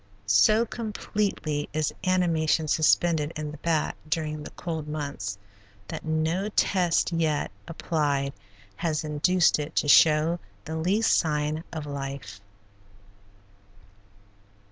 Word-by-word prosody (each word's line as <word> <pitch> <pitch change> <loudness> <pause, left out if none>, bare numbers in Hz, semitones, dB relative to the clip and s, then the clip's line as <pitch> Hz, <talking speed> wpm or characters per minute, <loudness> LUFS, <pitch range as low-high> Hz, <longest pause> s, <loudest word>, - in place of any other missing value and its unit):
So 155 - +4
completely 205 -9 -3
is 155 -1 0
animation 165 -4 +2
suspended 160 0 +2
in 155 -1 -4
the 150 - -10
bat 160 -1 0
during 155 -1 -2
the - - -7
cold 160 -3 -5
months 145 -9 -4 0.5
that - - -5
no 160 +5 0
test 180 -5 +2
yet 160 -3 0 0.2
applied 145 -5 -1 0.4
has 160 -3 -1
induced 160 +4 +2
it 150 +2 -5
to - - +1
show 155 +3 +5 0.3
the 160 0 -5
least 190 +8 +2
sign 150 0 0
of 155 -3 -5
life. 140 -7 -6
155 Hz, 110 wpm, -26 LUFS, 150-170 Hz, 0.5 s, show